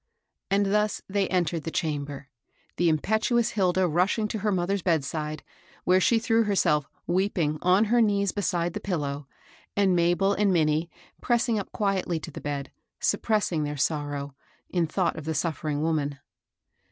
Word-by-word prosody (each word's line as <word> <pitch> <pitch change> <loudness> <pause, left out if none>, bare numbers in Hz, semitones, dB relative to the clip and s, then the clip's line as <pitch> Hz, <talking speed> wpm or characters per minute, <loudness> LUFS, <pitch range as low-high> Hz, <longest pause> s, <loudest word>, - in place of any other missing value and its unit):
And 200 0 +2
thus 210 0 +1
they 195 -1 0
entered 175 -3 0
the 165 - -3
chamber, 145 -3 -3 0.5
the 175 -1 +3
impet 215 +8 0
uous 235 -2 +2
Hilda 185 -2 +2
rushing 185 +6 +1
to 220 - -3
her 210 +1 0
mother's 190 +1 0
bedside, 155 -2 -1 0.4
where 185 +1 +4
she 230 - +4
threw 225 0 +2
herself, 160 -8 +2 0.2
weeping, 175 -5 0
on 185 +4 +4
her 235 +2 +3
knees 200 -3 +2
beside 175 -4 -1
the - - -3
pillow, 145 -7 -3 0.5
and 195 -3 +3
Mabel 175 +3 +3
and 205 -1 +2
Minnie, 160 -1 +2 0.3
pressing 235 -2 +1
up 200 - -7
quietly 190 -5 0
to 165 - -7
the - - -8
bed, 140 -1 -4 0.3
suppressing 200 -8 +1
their 145 0 -3
sorrow, 145 -1 -2 0.4
in 175 -3 +1
thought 170 +2 0
of 155 - -7
the 160 0 -2
suffering 150 -1 -1
woman. 150 -3 0
175 Hz, 160 wpm, -26 LUFS, 155-200 Hz, 0.5 s, where